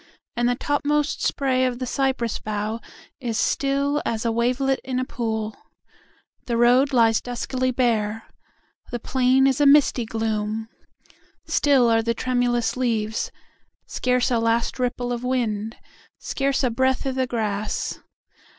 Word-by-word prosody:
And 240 Hz, 0 st, +1 dB
the 245 Hz, -, +1 dB
topmost 290 Hz, +2 st, 0 dB
sprayOf 255 Hz, -2 st, 0 dB
the 255 Hz, -, -3 dB
cypress 260 Hz, -3 st, -1 dB
bough 215 Hz, +1 st, -3 dB, 0.4 s
is 235 Hz, -3 st, -3 dB
stillAs 275 Hz, -4 st, 0 dB
a 230 Hz, -, +2 dB
wavelet 250 Hz, +4 st, +1 dB
in 255 Hz, -1 st, -3 dB
a 255 Hz, -, 0 dB
pool:The 225 Hz, +1 st, -6 dB
road 250 Hz, +4 st, +4 dB
lies 225 Hz, -3 st, +4 dB
duskily 255 Hz, +1 st, -2 dB
bare:The 225 Hz, 0 st, -3 dB
plain 260 Hz, +2 st, +2 dB
is 270 Hz, +1 st, +2 dB
a 290 Hz, -, +6 dB
misty 280 Hz, -4 st, +5 dB
gloom:Still 225 Hz, +4 st, -2 dB
are 225 Hz, -1 st, +3 dB
the 230 Hz, +1 st, -1 dB
tremulous 245 Hz, -2 st, 0 dB
leaves; 225 Hz, -3 st, -1 dB, 0.5 s
Scarce 250 Hz, +1 st, 0 dB
a 235 Hz, -, +2 dB
last 230 Hz, +2 st, 0 dB
ripple 245 Hz, 0 st, -1 dB
of 240 Hz, 0 st, -4 dB
wind, 225 Hz, -4 st, -1 dB, 0.4 s
Scarce 275 Hz, 0 st, -1 dB
a 250 Hz, -, +2 dB
breath 260 Hz, +3 st, +1 dB
i' 270 Hz, -, 0 dB
the 260 Hz, 0 st, -1 dB
grass. 215 Hz, -3 st, -2 dB
245 Hz, 125 wpm, -23 LUFS, 225-260 Hz, 0.5 s, a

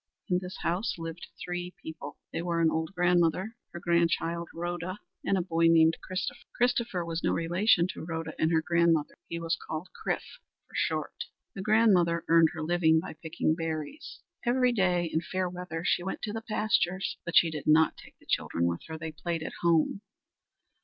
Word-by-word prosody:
In 180 Hz, -1 st, +3 dB
this 180 Hz, 0 st, -7 dB
house 185 Hz, +7 st, 0 dB
lived 165 Hz, +1 st, -6 dB, 0.2 s
three 175 Hz, 0 st, -4 dB
people. 155 Hz, -2 st, -8 dB, 0.2 s
They -, -, -1 dB
were 170 Hz, -1 st, -1 dB
an 165 Hz, -1 st, +4 dB
old 160 Hz, +1 st, -1 dB
grandmother; 180 Hz, +4 st, +2 dB, 0.2 s
her 170 Hz, -, -7 dB
grandchild, 170 Hz, 0 st, +1 dB
Rhoda; 175 Hz, +2 st, -4 dB, 0.3 s
and 195 Hz, -, +2 dB
a 180 Hz, -, 0 dB
boy 165 Hz, -1 st, +2 dB
named 165 Hz, 0 st, +5 dB
Christopher. 185 Hz, 0 st, -4 dB
Christopher 235 Hz, -7 st, +1 dB
was 165 Hz, 0 st, -3 dB
no -, -, +2 dB
relation 175 Hz, +2 st, +3 dB
to -, -, -6 dB
Rhoda 165 Hz, 0 st, -4 dB
and 160 Hz, -, +2 dB
her 160 Hz, -1 st, +3 dB
grandmother. 170 Hz, -2 st, +2 dB
He 170 Hz, -, -4 dB
was 165 Hz, 0 st, 0 dB
called 160 Hz, +4 st, -4 dB
Chrif -, -, -2 dB, 0.4 s
for -, -, -24 dB
short. -, -, -1 dB, 0.3 s
The 195 Hz, -, -6 dB
grandmother 190 Hz, -6 st, +4 dB
earned 165 Hz, -1 st, +6 dB
her 160 Hz, -2 st, -4 dB
living 160 Hz, -1 st, +3 dB
by -, -, -6 dB
picking 160 Hz, 0 st, -1 dB
berries. 160 Hz, -, -5 dB, 0.2 s
Every 250 Hz, +1 st, +3 dB
day 180 Hz, -6 st, +2 dB
in 160 Hz, 0 st, -1 dB
fair 185 Hz, +1 st, -2 dB
weather 175 Hz, -2 st, -5 dB
she -, -, +2 dB
went 190 Hz, +2 st, -4 dB
to 210 Hz, -, -2 dB
the 225 Hz, -, -3 dB
pastures. 205 Hz, -4 st, 0 dB
But 170 Hz, -, -4 dB
she 165 Hz, -, +6 dB
did 150 Hz, -2 st, -6 dB
not 155 Hz, +1 st, +5 dB
take -, -, -15 dB
the -, -, -23 dB
children 85 Hz, -, 0 dB
with 85 Hz, 0 st, -1 dB
her. 160 Hz, 0 st, -5 dB
They 160 Hz, 0 st, -5 dB
played 165 Hz, +1 st, -3 dB
at -, -, -5 dB
home. 170 Hz, +3 st, +2 dB
170 Hz, 185 wpm, -29 LUFS, 160-185 Hz, 0.4 s, earned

